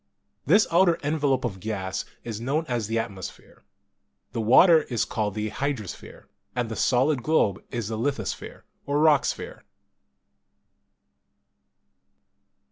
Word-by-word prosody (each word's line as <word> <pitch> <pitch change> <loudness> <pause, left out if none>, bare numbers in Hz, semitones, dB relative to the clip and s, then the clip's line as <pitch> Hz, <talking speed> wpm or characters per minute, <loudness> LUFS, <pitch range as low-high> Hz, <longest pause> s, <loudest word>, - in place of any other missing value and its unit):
This 205 +8 +5
outer 170 0 +4
envelope 145 -3 +1
of 95 -5 -4
gas 95 -2 -3 0.2
is 115 -2 -5
known 145 +6 -1
as 120 -7 -2
the 115 +1 -1
atmosphere, 100 -5 -7 0.7
the 115 - -2
water 160 - +6
is 120 -6 -2
called 105 -4 -2
the 110 0 -2
hydrosphere, 135 -6 -5 0.3
and 120 -2 -1
the 110 - -4
solid 130 +3 +2
globe 115 - +1
is 120 -4 -3
the 110 -1 -3
lithosphere 120 -4 -3 0.2
or 145 +1 +1
rock 150 -2 +4
sphere. - - -5
120 Hz, 125 wpm, -25 LUFS, 110-145 Hz, 0.7 s, water